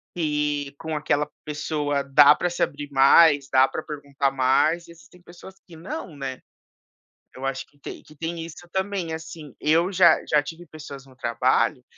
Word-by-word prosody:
que 150 -3 -1
com 160 -1 -4
aquela 150 0 0 0.2
pessoa 145 -1 -2
dá 145 +1 +7
pra 175 - -2
se 175 - -1
abrir 145 0 -4
mais, 140 +1 +5
dá 130 0 +5
pra 155 - -6
perguntar 140 -2 -3
mais, 135 +6 +1
e - - -13
existem 170 +2 -18
pessoas 180 +2 -14
que 170 - -13
não, 160 -1 -7
né? 135 -2 -5 1.0
Eu 130 +1 -7
acho 135 0 -3
que 145 - -30
tem - - -9
que 155 - -18
tem 165 +2 -5
isso 170 +1 -11
também, 190 -3 -2
assim. 160 -3 -9
Eu 165 +5 +2
já 180 -1 +6
já 150 -1 +3
tive 165 +3 -9
pessoas 145 -3 -11
no 130 -1 -19
trabalho, 125 +2 0
150 Hz, 175 wpm, -24 LUFS, 140-165 Hz, 1.0 s, dá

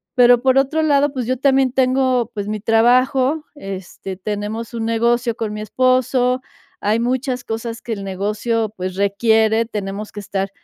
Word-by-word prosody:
pero 245 -1 +6
por 260 0 +3
otro 290 +4 +2
lado, 290 -1 +3
pues, 255 -3 -3
yo 255 - +1
también 270 -1 +3
tengo, 255 -2 +1
pues, 205 -2 -4
mi 215 0 -2
trabajo, 255 +6 +3
este, 195 -4 -7
tenemos 210 +3 -4
un 225 -1 -3
negocio 235 +1 +1
con 220 -3 -3
mi 210 - -5
esposo, 255 +2 +1 0.4
hay 215 +2 +1
muchas 255 0 -1
cosas 230 0 -5
que 235 - -6
el 200 -2 -6
negocio, 210 +3 -2
pues, 185 0 -4
requiere, 220 +3 +2
tenemos 210 -1 -5
que 205 - -6
estar 195 0 -3
230 Hz, 165 wpm, -19 LUFS, 210-255 Hz, 0.4 s, pero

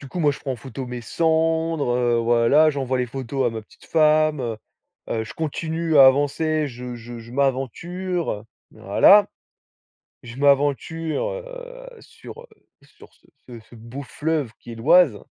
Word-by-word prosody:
Du 140 - -11
coup 180 - -6
moi 150 -3 +3
je - - -10
prends 135 - -3
en 125 - -6
photo 130 +2 -8
mes 125 0 -6
sandres, 160 +1 0
heu, 120 -1 +1
voilà, 120 +7 +4
j'envoie 130 -2 -2
les 125 - 0
photos 130 +1 -3
à - - +1
ma 110 -1 -6
petite - - -21
femme, 155 -2 +3
heu 115 -3 -3 0.5
heu, 110 - -2
je - - -10
continue 160 +1 -2
à 135 -1 +9
avancer, 150 +3 +2
je 125 -2 -8
je 120 0 -10
je 115 - -13
m'aventure 140 - -2 0.3
voilà. 200 - +5 1.0
Je 120 0 -10
m'aventure, 145 - +1
heu, - - -9
sur, 470 - -13
heu, - - -17 0.4
sur - - -19
ce 120 -2 -16
ce 110 - -18
beau 115 +5 -9
fleuve 150 -2 -2
qui 120 - -11
est - - -8
l'Oise. 135 0 +4
140 Hz, 165 wpm, -22 LUFS, 120-160 Hz, 1.0 s, à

